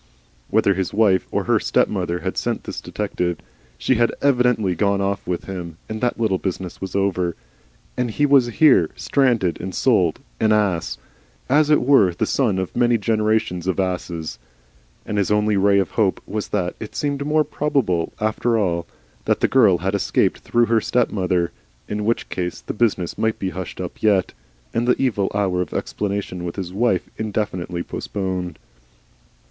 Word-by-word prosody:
Whether 100 - +3
his 95 0 -3
wife 100 -4 +3
or - - -1
HER - - +2
stepmother 90 -3 0
had - - -3
sent - - -2
the - - -6
detective, 90 -2 -3 0.4
SHE 130 - +1
had 120 0 +3
evidently 125 -8 +2
gone 100 +3 +1
off 100 0 -2
with 90 -1 -2
him, 85 -4 -6
and 110 0 -5
that 120 -1 0
little 105 -5 +1
business 95 -2 -4
was 95 - -5
over. 90 -3 0 0.6
And 125 -1 -1
he 145 +7 +1
was 135 -4 +5
here, 120 - +4
stranded 120 -10 +1
and 95 0 -5
sold, 95 -11 +2 0.2
an 110 0 +3
ass, 100 -6 0 0.5
and 140 +4 +4
as 155 -1 +2
it 150 - +4
were, 125 -10 +4
the - - 0
son 115 -9 +1
of 95 -1 -3
many 120 -1 +3
generations 110 -4 0
of 95 0 0
asses. 90 -6 -3 0.7
And 105 - -1
his 100 - +1
only 105 0 +2
ray 100 +1 +4
of 95 - +1
hope 105 -4 +1
was 105 +1 -4
that 90 -4 -1
it 110 - -8
seemed 140 -1 -1
more 155 +1 +2
probable, 135 - 0
after 110 +2 +1
all, 85 -5 0 0.4
that - - +1
the - - +4
girl 110 -9 +5
had 95 +3 -2
escaped 100 - +1
through 120 0 +2
her 115 -1 +2
stepmother. 90 -8 0 0.4
In 105 0 -3
which 115 +2 0
case 90 -1 -3
the - - -5
business 105 -6 0
might 110 0 +1
be 95 -1 -3
hushed 95 -2 -6
up 90 -2 -6
yet, 100 -4 +2 0.4
and 120 +1 0
the 125 - +3
evil 110 -7 +1
hour 95 -3 +1
of 90 - -5
explanation 100 -3 -3
with 85 -1 -4
his 95 -2 -5
wife 100 -3 +1
indefinitely 95 -5 -2
postponed. 90 -4 -4
100 Hz, 175 wpm, -21 LUFS, 90-115 Hz, 0.7 s, was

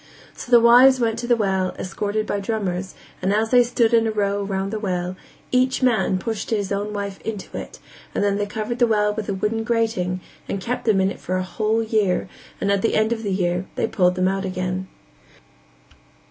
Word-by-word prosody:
So - - -9
the 240 -1 +8
wives 250 +3 +7
went 230 -1 0
to 240 - -4
the 240 - +4
well, 190 -4 0
escorted 205 +3 -2
by 205 - -2
drummers, 190 -3 -3 0.3
and 190 +1 +1
as 220 +2 +1
they 250 -1 +7
stood 240 -1 +1
in 225 -1 +4
a - - 0
row 205 -1 0
round 195 0 -2
the 215 - -2
well, 180 -3 -2 0.4
each 255 +1 +2
man 220 -6 +2
pushed 220 +2 -4
his 205 -3 -1
own 205 +1 -2
wife 200 -1 -5
into 215 -3 -6
it - - -7 0.4
and - - +1
then 200 -1 +1
they 205 - -1
covered 220 +3 -4
the 240 - +5
well 210 -2 +2
with 210 -1 -5
a 200 - -1
wooden 215 +3 -1
grating 225 -6 0 0.3
and 195 - -2
kept 245 +6 -3
them 215 -4 +3
in 190 +1 +2
it - - -9
for 185 +1 -2
a 185 - -1
whole 220 +4 0
year 215 -5 +1 0.3
and 200 - 0
at 200 -1 +2
the 225 - +1
end 220 +2 +2
of 225 - -5
the 205 -3 -2
year 180 -1 0
they - - 0
pulled 180 -4 +2
them 185 0 +1
out 195 +1 -1
again. 185 0 -3
205 Hz, 215 wpm, -22 LUFS, 190-225 Hz, 0.4 s, the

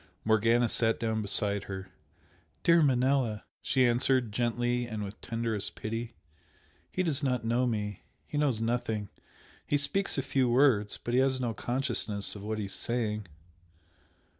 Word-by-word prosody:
Morgana 115 +2 +3
sat 115 0 +3
down 110 -1 -1
beside 100 0 +1
her. 95 -1 -6 0.7
"Dear 170 0 +5
Manella" 130 -5 +2 0.2
she 130 -1 +2
answered, 120 -1 +2
gently 120 +2 0
and 110 -2 -4
with 100 +1 -8
tenderest 115 -3 -2
pity 115 +1 -5 0.8
"He 185 - 0
does 155 -5 +1
not 125 -5 0
know 120 +2 +2
me. 105 -4 -3 0.2
He 145 - -3
knows 135 -7 +1
nothing! 115 -3 -1 0.6
He 145 - +2
speaks 190 +7 0
a 135 - 0
few 130 -2 +1
words, 120 -5 +3
but 120 - -5
he 125 - +4
has 130 -1 +2
no 120 -3 -1
consciousness 120 -5 -1
of 100 - -8
what 110 +1 -3
he 105 - -2
is 100 - -6
saying." 110 -4 -2
120 Hz, 155 wpm, -30 LUFS, 110-130 Hz, 0.8 s, Dear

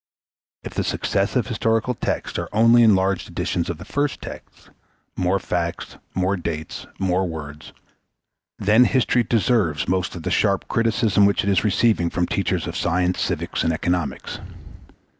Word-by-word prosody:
If - - -7
the - - -1
successive - - 0
historical 115 +2 0
texts - - -3
are - - -4
only 115 +2 +5
enlarged 95 -4 +3
editions 85 - -2
of 85 - -3
the - - -10
first 145 0 -1
text - - -11 0.4
more 90 +1 +1
facts, 85 -3 -3 0.2
more 95 +2 +1
dates, 80 -3 -5
more 95 0 0
words 75 -3 -8 0.9
then 110 +5 +4
history 125 -1 +2
deserves 105 -10 +1
most 95 0 -1
of 85 - -7
the - - -2
sharp 100 -2 +1
criticism 110 -3 +2
which 100 - +1
it 100 - +1
is 95 - +2
receiving 105 -4 +2
from 90 - 0
teachers 95 -3 -1
of 85 - -5
science, 90 +1 0
civics, - - -2
and 85 - +2
economics. 90 -1 -2
95 Hz, 150 wpm, -22 LUFS, 85-110 Hz, 0.9 s, only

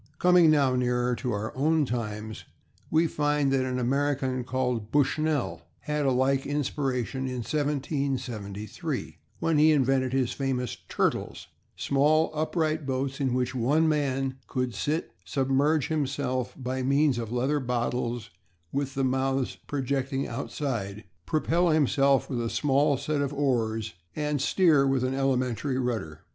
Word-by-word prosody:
Coming 180 -2 +5
now 140 -4 +4
nearer 125 0 +1
to 125 0 -2
our 105 +1 -3
own 155 +3 +2
times, 110 -3 -4 0.4
we 160 +1 +3
find 145 -3 +1
that 135 -1 +2
an 125 0 -2
American 130 0 0
called 125 -4 -2
Bushnell 145 - +1 0.2
had 150 -1 -1
a - - +4
like 130 +1 +2
inspiration 135 -3 -1
in 125 -2 -3
1773, 130 -8 -3 0.2
when 160 -2 +1
he 155 +1 +6
invented 135 -3 +2
his 130 -2 +1
famous 130 -3 -2
"Turtles," - - -1 0.3
small, 150 +3 +2
upright 155 -1 -1
boats 135 +1 -2
in 130 -2 +1
which 125 -1 0
one 140 +6 +2
man 135 -3 0
could 125 -2 -2
sit, 150 +10 -2
submerge 135 - +1
himself 140 -4 -1
by 130 0 -3
means 140 0 +2
of 115 -2 -5
leather 130 +5 +1
bottles 120 -2 -2 0.4
with 140 -1 -2
the 135 - 0
mouths 130 0 0
projecting 135 0 -1
outside, 115 -5 -4 0.2
propel 170 +3 +2
himself 140 -3 +3
with 125 -4 -2
a 115 - -1
small 140 +4 +2
set 150 +2 -1
of 140 -1 -1
oars 115 -6 0 0.2
and 150 -2 -1
steer 150 -3 +4
with 135 -2 +1
an 130 +1 0
elementary 130 0 0
rudder. 110 - -3
135 Hz, 140 wpm, -27 LUFS, 125-145 Hz, 0.4 s, he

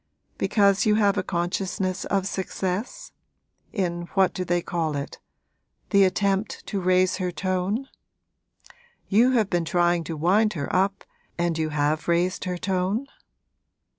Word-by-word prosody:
'Because 200 -2 +3
you 210 - +4
have 205 -2 +3
a - - +1
consciousness 185 +1 -2
of 195 -2 0
success? 195 - -3 0.6
in 175 -4 -2
what 190 -1 +3
do 185 - -3
they 175 0 +1
call 160 -3 -2
it? 140 0 -5 0.7
the 200 -2 +6
attempt 195 +2 0
to 200 -3 -3
raise 185 0 +3
her 180 -1 -2
tone? 185 +7 -2 1.2
You 235 +6 +4
have 225 -5 +3
been 175 -2 +1
trying 175 0 +2
to 160 -1 -5
wind 205 +7 +3
her 145 0 -3
up, 195 +1 +1 0.3
and 170 -1 0
you 160 -1 -1
have 150 +1 0
raised 175 +3 +1
her 180 -1 -2
tone?' 190 +6 -1
185 Hz, 140 wpm, -25 LUFS, 175-200 Hz, 1.2 s, the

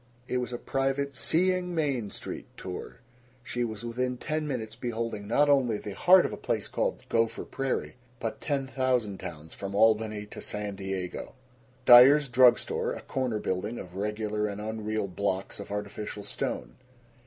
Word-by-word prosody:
It 125 - 0
was 125 0 -2
a 120 - -3
private 135 +2 -1
Seeing 180 +5 +1
Main 135 -9 0
Street - - -6
tour. 95 +6 -7 0.4
She 120 0 -2
was 110 0 -4
within 125 +2 -1
ten 155 +3 -2
minutes 115 -6 -4
beholding 115 -3 -3
not 145 +7 +4
only 130 -6 +3
the 105 -1 -6
heart 180 - +6
of - - -2
a - - -5
place - - -1
called - - -1
Gopher 115 0 0
Prairie, 135 -2 -3 0.2
but 115 - -4
ten 140 -3 -1
thousand 125 -6 0
towns 80 0 -8
from 100 0 -5
Albany 110 -1 +3
to 105 - -9
San 105 -1 -3
Diego: 95 +3 -5 0.5
Dyer's 135 +4 +9
Drug 125 0 +7
Store, - - -2
a - - -7
corner 130 -4 -1
building 105 +3 -2
of 90 -1 -9
regular 105 +1 -1
and 100 0 -5
unreal 110 -1 -2
blocks 95 +1 -2
of 100 - -7
artificial 105 0 -5
stone. 100 - -4
115 Hz, 165 wpm, -28 LUFS, 105-130 Hz, 0.5 s, Dyer's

